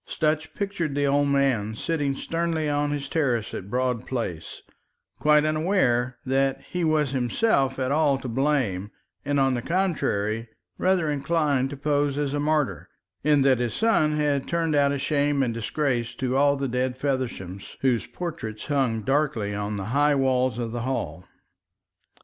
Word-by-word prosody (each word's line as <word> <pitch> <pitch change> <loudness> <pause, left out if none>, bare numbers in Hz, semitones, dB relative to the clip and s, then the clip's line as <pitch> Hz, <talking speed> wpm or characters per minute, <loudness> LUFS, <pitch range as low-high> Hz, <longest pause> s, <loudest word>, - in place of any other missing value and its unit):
Sutch 155 0 -1
pictured 195 -8 -2
the 145 0 +1
old 145 +1 +2
man 130 -7 +1
sitting 145 +1 -1
sternly 165 0 -1
on 145 0 0
his 145 -1 -3
terrace 125 -9 0
at 95 - -6
Broad 125 0 -1
Place, 100 -11 -4 0.6
quite 150 0 +4
unaware 155 -7 +1
that 135 +1 +1
he 180 -1 -2
was 155 -4 +2
himself 135 - +1
at 130 0 -1
all 145 -2 +3
to 130 - -7
blame, 120 -7 0 0.3
and 145 0 0
on 135 -1 +3
the 120 - -1
contrary, 115 - -1 0.3
rather 180 -5 +2
inclined 145 -2 +1
to 145 - -7
pose 145 0 0
as 145 -1 -1
a 145 - 0
martyr, 150 -1 0 0.3
in 145 -1 +4
that 130 -3 +4
his 120 -2 -1
son 220 -9 +2
had 145 -2 0
turned 165 -2 0
out 140 -1 +3
a 140 - -1
shame 145 0 +1
and 120 -3 -1
disgrace 120 +1 -1
to 130 -1 -1
all 140 +1 +4
the 135 0 -2
dead 125 +1 -1
Fevershams 125 -9 -3
whose 125 -4 +1
portraits 115 -12 -6
hung 130 -7 0
darkly 135 -5 0
on 105 +1 -3
the 95 - -4
high 145 +1 +4
walls 130 -3 +1
of 115 -2 -3
the 120 0 -3
hall. 90 -10 -3
140 Hz, 165 wpm, -25 LUFS, 125-150 Hz, 0.6 s, quite